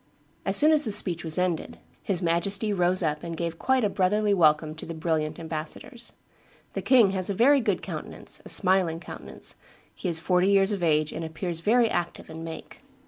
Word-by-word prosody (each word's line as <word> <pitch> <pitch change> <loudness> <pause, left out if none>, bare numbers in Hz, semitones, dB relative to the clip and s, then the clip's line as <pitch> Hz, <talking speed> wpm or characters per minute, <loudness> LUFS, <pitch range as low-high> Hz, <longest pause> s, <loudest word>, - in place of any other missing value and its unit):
As - - +4
soon 305 +1 +6
as 305 -1 +6
the 220 - +1
speech 180 -4 +3
was 160 -2 0
ended, 180 -3 -2 0.2
his 185 -2 -2
Majesty 195 +5 0
rose 180 0 +1
up 150 -1 -1
and 170 -1 -6
gave 165 -1 -4
quite 260 -2 +1
a - - +3
brotherly 205 +2 +1
welcome 155 -3 +3
to 160 - -9
the 165 - -6
brilliant 160 -1 -1
ambassadors. 165 - -5 0.6
The - - -3
king 235 -7 +5
has 190 -1 -2
a 200 - -1
very 275 +6 +5
good - - -1
countenance, - - -6
a - - -9
smiling 185 -4 +2
countenance; - - -7 0.4
he 185 - -4
is 165 -1 +1
forty 180 +2 +2
years 195 0 +4
of 200 -3 -3
age, 155 -2 +2
and 165 - -5
appears 165 +1 -4
very 230 +6 +3
active 175 -5 -4
in 160 +1 -8
make. 165 -1 -9
180 Hz, 195 wpm, -26 LUFS, 165-200 Hz, 0.6 s, soon